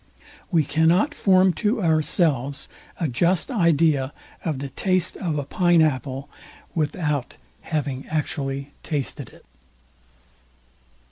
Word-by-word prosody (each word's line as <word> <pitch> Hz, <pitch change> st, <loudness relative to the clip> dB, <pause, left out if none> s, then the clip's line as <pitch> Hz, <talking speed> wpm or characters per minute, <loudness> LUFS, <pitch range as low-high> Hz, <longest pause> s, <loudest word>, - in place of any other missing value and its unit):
We 165 Hz, -5 st, +3 dB
cannot 165 Hz, -, +2 dB
form 185 Hz, -1 st, +4 dB
to 215 Hz, -1 st, +1 dB
ourselves 155 Hz, -4 st, +1 dB, 0.3 s
a 165 Hz, -, 0 dB
just 170 Hz, -, +2 dB
idea 160 Hz, -, +2 dB, 0.3 s
of 155 Hz, -5 st, -1 dB
the 135 Hz, 0 st, -6 dB
taste 185 Hz, +3 st, +1 dB
of 165 Hz, -5 st, -2 dB
a 145 Hz, -, -1 dB
pine 175 Hz, +4 st, +3 dB
apple, 135 Hz, -1 st, -1 dB, 0.5 s
without 150 Hz, -3 st, -2 dB, 0.2 s
having 140 Hz, -4 st, -3 dB
actually 140 Hz, -2 st, -3 dB
tasted 145 Hz, -4 st, -4 dB
it. -, -, -19 dB
155 Hz, 110 wpm, -23 LUFS, 140-175 Hz, 0.5 s, form